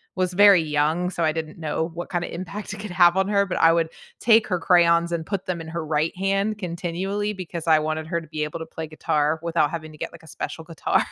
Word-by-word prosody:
was 185 -1 0
very 200 -3 +7
young, 155 +4 0
so 170 - -2
I 155 - +3
didn't 160 0 -5
know 160 +1 -2
what 175 +1 -6
kinda 175 -2 -3
impact 195 +4 -6
it - - -7
could 210 0 -6
have 175 0 +5
on 190 0 +2
her, 200 -1 +2
but 190 - -3
I 165 0 +6
would 165 -1 +1 0.3
take 225 -1 +5
her 180 -3 0
crayons 170 -1 +4
and 170 -2 -1
put 195 +1 -4
them 180 -3 -3
in 160 - -8
her 165 -1 -4
right 155 +1 0
hand 195 +2 0
continually 190 +3 -3
because 175 -3 -7
I 160 -1 +6
wanted 155 +1 -2
her 170 0 -1
to 165 - -12
be 155 -1 -3
able 150 +2 -4
to 160 - -6
play 160 0 -7
guitar 155 0 0
without 165 -3 +1
having 155 -1 -6
to 155 - -14
get, - - -4
like, 170 -1 -14
a - - -15
special 160 +2 -6
guitar, 165 -2 0
170 Hz, 255 wpm, -24 LUFS, 160-185 Hz, 0.3 s, very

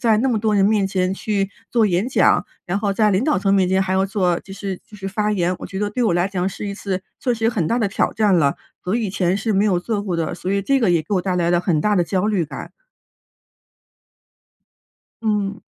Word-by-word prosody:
在 225 -4 +3
那 265 - +1
么 235 -4 +1
多 215 0 +1
人 195 - +4
面 205 -1 +3
前 185 -1 0
去 195 -1 -1 0.2
做 235 -2 +4
演 190 +5 0
讲， 265 - +3 0.2
然 180 +3 -1
后 205 -1 0
在 210 +1 +3
领 195 +6 +1
导 300 - +2
层 195 +1 +1
面 190 -2 +3
前 190 +1 +2
还 190 0 -2
要 190 +1 +2
做， 185 -4 +1
就 195 - -12
是 195 -2 -5
就 220 - -14
是 195 -1 -5
发 210 +2 0
言， 180 -2 0
我 - - -7
觉 190 - -6
得 205 - -1
对 250 +4 -1
我 195 - +2
来 175 +2 +1
讲 185 -1 -1
是 205 +1 -6
一 - - -3
次 190 -2 -3 0.2
确 245 - +1
实 225 -1 -1
有 - - +3
很 195 -10 -1
大 235 - +1
的 205 - +1
挑 195 - 0
战 215 -2 +2
了， 140 -4 +3 0.3
我 185 +3 -1
以 225 -5 -1
前 185 0 +1
是 215 +2 -1
没 200 +1 +2
有 185 -4 +2
做 215 +2 -2
过 185 -4 -2
的。 165 -1 -2
所 180 - -4
以 200 0 0
这 275 +6 +2
个 225 -8 +2
也 165 - +2
给 185 - -7
我 185 - +2
带 185 0 -1
来 175 -1 +1
了 175 - +3
很 165 -5 +1
大 210 +4 +2
的 175 - +3
焦 190 +3 0
虑 200 -6 +1
感。 145 -2 -8 2.5
嗯。 210 -2 -1
195 Hz, 280 characters per minute, -21 LUFS, 185-210 Hz, 2.5 s, 人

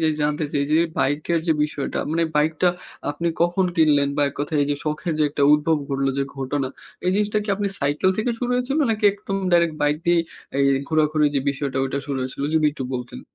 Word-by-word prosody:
জিনিস 155 -1 +2
জানতে 150 +1 0
চাই 140 -1 +1
যে, - - +5 0.2
বাইকের 150 +5 +1
যে 160 - +4
বিষয়টা, 150 -2 -4
মানে 165 +1 +1
বাইকটা 155 +4 +2 0.4
আপনি 170 +4 -2
কখন 175 +2 +2
কিনলেন? 150 -3 +4
বা 145 - +3
১ 140 - -10
কথায় 150 +1 -1
এই - - 0
যে, 145 - 0
শখের 155 +3 -2
যে - - +3
একটা 145 - -1
উদ্ভব 155 +2 +3
ঘটলো 135 0 0
যে 140 - +1
ঘটনা, 135 0 -2 0.4
এই - - +4
জিনিসটা 210 +1 +1
কি 210 - -11
আপনি 205 -1 -1
সাইকেল 145 +6 +1
থেকে 230 +3 +1
শুরু 245 -1 -2
হয়েছিল? 250 +4 0
নাকি, 215 -1 -1
একদম 200 -1 -5 0.2
ডাইরেক্ট 170 -2 +3
বাইক 145 0 +2
দিয়েই 175 -1 +4 0.3
এ - - 0 0.2
এই 135 - 0
ঘোরাঘুরি 155 -1 +2
যে 140 - +2
বিষয়টা, 140 -1 -4
ওইটা 135 +1 -2
শুরু 140 -2 -2
হয়েছিল? 130 +2 -4
যদি 160 -1 +3
একটু 135 -3 -5
বলতেন। 125 -1 -6
150 Hz, 215 wpm, -22 LUFS, 140-170 Hz, 0.4 s, যে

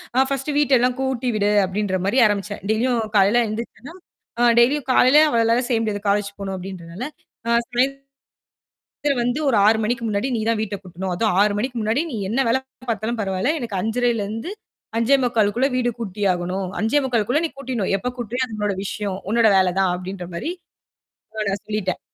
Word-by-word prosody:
அ 260 - +5
"first 275 +2 -2
வீட்டை 290 -2 +3
எல்லாம் 250 +1 +2
கூட்டி 265 -1 -1
விடு" 205 -1 +2
அப்படின்ற 190 0 -1
மாதிரி 205 +6 +1
ஆரம்பிச்சேன். 205 -1 -1
டெய்லியும் 235 +2 +1
காலைல 205 +4 +5
எந்திருச்சன்னா 230 +6 -7 0.5
அ - - +1 0.2
டெய்லியும் 265 +3 +3
காலைல 255 +3 +6
அவளாலலாம் 235 0 +2
செய்ய 235 -3 +2
முடியாது. 205 -2 -2
காலேஜ் 200 0 +1
போணும் 195 -1 -4
அப்படின்றனால, 180 +1 -8 0.4
அ - - 0 0.2
"சாயந்திரம் 275 +3 -1 1.1
வந்து 245 +5 0
ஒரு 250 - +3
6 220 +1 +5
மணிக்கு 235 +2 -1
முன்னாடி 210 +4 -1
நீ 220 - -2
தான் 225 -2 0
வீட்டைக் 200 -2 -5
கூட்டணும். 185 +1 -5
அதும் 215 +3 +1
6 210 -1 +2
மணிக்கு 250 0 -3
முன்னாடி, 220 +7 +1
நீ - - -3
என்ன 265 +4 +1
வேலை 260 +3 +2 0.3
பாத்தாலும் 225 +1 -2
பரவால்லை, 195 +7 0
எனக்கு 225 -5 -3
5:30ல 235 0 0
இருந்து 225 - -5 0.4
5:45க்கு 230 -3 +2
உள்ள 265 +2 +3
வீடு 245 -1 +1
கூட்டி 205 -3 -5
ஆகணும். 180 +2 -3
5:45குள்ள 245 +1 +1
நீ - - +1
கூட்டிட்னும். 245 -8 -2
எப்ப 225 +6 -3
கூட்டுறியோ 245 +1 -2
அது 225 - -9
உன்னோட 210 -1 0
விஷயம், 200 -1 -3
உன்னோட 230 0 +4
வேலை 185 -1 +4
தான்" 190 -2 +2
அப்படின்ற 185 0 -6
மாரி 170 - -4 1.2
சொல்லிட்டேன். 210 -4 -2
225 Hz, 170 wpm, -22 LUFS, 200-250 Hz, 1.2 s, காலைல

